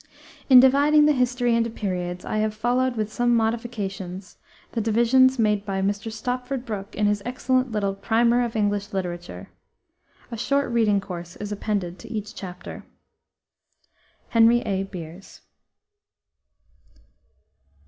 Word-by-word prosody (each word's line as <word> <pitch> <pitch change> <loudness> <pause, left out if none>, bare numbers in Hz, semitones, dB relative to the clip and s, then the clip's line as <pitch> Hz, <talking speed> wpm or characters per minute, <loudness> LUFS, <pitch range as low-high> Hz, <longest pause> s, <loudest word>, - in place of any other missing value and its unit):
In 255 -2 +10
dividing 285 +4 +5
the 300 - +5
history 245 -2 +1
into 230 0 +1
periods, 180 -5 -4
I - - -2
have 215 0 0
followed, 245 +3 0
with 215 -1 -3
some 240 0 +2
modifications, 205 -5 -3 0.3
the 230 - -2
divisions 240 +4 +4
made 210 -3 +1
by 195 -2 -3
Mr. 205 +3 -2
Stopford 250 +3 -4
Brooke 205 -2 -6
in 210 - 0
his 205 0 +1
excellent 255 +1 0
little 200 -2 -1
Primer 235 +4 +2
of 235 -1 -4
English 205 -1 -1
Literature. 175 -2 -5 0.8
A 230 - -5
short 275 +3 0
reading 215 -4 +2
course 175 -2 -8
is 205 0 -7
appended 200 -4 -3
to 230 - -11
each 215 -2 -5
chapter. 180 -2 -8 1.5
HENRY 230 +1 +5
A. 195 -3 -2
BEERS. 180 -1 -10
220 Hz, 130 wpm, -24 LUFS, 200-240 Hz, 1.5 s, In